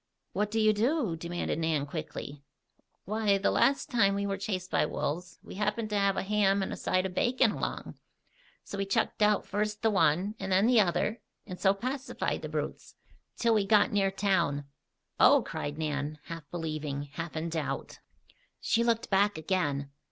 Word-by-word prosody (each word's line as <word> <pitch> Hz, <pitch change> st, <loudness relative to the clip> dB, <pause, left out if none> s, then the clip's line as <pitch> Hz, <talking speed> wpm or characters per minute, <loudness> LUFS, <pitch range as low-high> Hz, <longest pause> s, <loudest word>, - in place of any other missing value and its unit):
"What 210 Hz, 0 st, 0 dB
do 225 Hz, +1 st, -1 dB
you 215 Hz, 0 st, +5 dB
do?" 230 Hz, -, +1 dB
demanded 170 Hz, 0 st, -3 dB
Nan 160 Hz, -3 st, 0 dB
quickly. 150 Hz, -2 st, -6 dB, 0.6 s
"Why, 210 Hz, 0 st, +2 dB
the 195 Hz, -, +1 dB
last 275 Hz, +1 st, +2 dB
time 200 Hz, -5 st, +3 dB
we 200 Hz, 0 st, -1 dB
were 200 Hz, -1 st, -1 dB
chased 190 Hz, -2 st, -4 dB
by -, -, +3 dB
wolves, 170 Hz, +3 st, -3 dB
we -, -, -10 dB
happened 210 Hz, +2 st, -2 dB
to -, -, 0 dB
have 200 Hz, -1 st, +2 dB
a -, -, 0 dB
ham 200 Hz, -1 st, +2 dB
and -, -, -4 dB
a -, -, -3 dB
side 185 Hz, 0 st, 0 dB
of 185 Hz, -, -4 dB
bacon 245 Hz, +2 st, +2 dB
along. -, -, -5 dB, 0.6 s
So 200 Hz, -, -7 dB
we 195 Hz, -, -1 dB
chucked 195 Hz, -, 0 dB
out 210 Hz, 0 st, +3 dB
first 210 Hz, +1 st, -2 dB
the 225 Hz, -, +4 dB
one, 190 Hz, +1 st, +2 dB
and 190 Hz, 0 st, -4 dB
then 190 Hz, +3 st, +4 dB
the 240 Hz, -1 st, +5 dB
other, 210 Hz, +4 st, 0 dB, 0.2 s
and 180 Hz, -3 st, -8 dB
so 195 Hz, 0 st, +3 dB
pacified 260 Hz, +5 st, -3 dB
the -, -, -5 dB
brutes -, -, -5 dB, 0.4 s
till 235 Hz, -1 st, +3 dB
we 215 Hz, -2 st, +3 dB
got 210 Hz, +1 st, +4 dB
near 195 Hz, -1 st, +2 dB
town." 180 Hz, -8 st, 0 dB, 0.5 s
"Oh!" -, -, +6 dB
cried 145 Hz, +1 st, -5 dB
Nan, 150 Hz, -1 st, -2 dB
half 165 Hz, -3 st, -8 dB
believing, 155 Hz, -4 st, -3 dB
half 165 Hz, +2 st, -5 dB
in 160 Hz, +2 st, -2 dB
doubt. 160 Hz, -2 st, -4 dB, 0.6 s
She 235 Hz, -, +1 dB
looked 230 Hz, -2 st, 0 dB
back 200 Hz, 0 st, +3 dB
again. 145 Hz, -5 st, -1 dB
195 Hz, 180 wpm, -29 LUFS, 165-210 Hz, 0.6 s, Oh